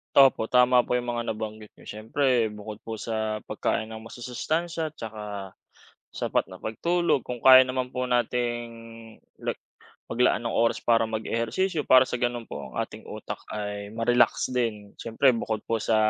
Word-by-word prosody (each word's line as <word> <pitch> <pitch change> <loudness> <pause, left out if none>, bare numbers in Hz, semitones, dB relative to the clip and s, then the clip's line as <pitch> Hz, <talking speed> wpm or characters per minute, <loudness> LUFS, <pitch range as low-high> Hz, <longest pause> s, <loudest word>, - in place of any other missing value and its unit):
Opo, 135 -5 +6
tama 125 +1 +5
po - - +1
yung 120 0 -1
mga 120 -1 -2
nabanggit 110 -1 -7
n'yo. - - -18
Siyempre, 115 +2 +1
bukod 105 0 -8
po 115 - -4
sa 110 -1 -3
pagkain 110 +1 -2
ng 110 - -7
masusustansiya 160 +8 -3
at - - -54
saka 110 -5 -7 0.9
sapat - - 0
na - - -12
pagtulog, 170 +5 0
kung 125 -2 -5
kaya 130 0 +9
naman 130 0 -2
po 125 0 -2
nating 120 -1 0 0.7
like - - -3 0.5
maglaan 120 -2 +2
ng 115 - -1
oras 115 0 +2
para 115 -1 +3
mag-ehersisyo, 115 - -1
para 130 0 +8
sa - - -2
gano'n 120 -1 -1
po - - -5
ang 65 - -10
ating - - -6
utak - - -6
ay 105 -1 -4
ma-relax 120 +1 +2
din. 110 -5 -2
Siyempre, 115 +4 +3
bukod 110 -2 -2
po 115 0 +1
sa 110 - +1
115 Hz, 165 wpm, -26 LUFS, 110-125 Hz, 0.9 s, kaya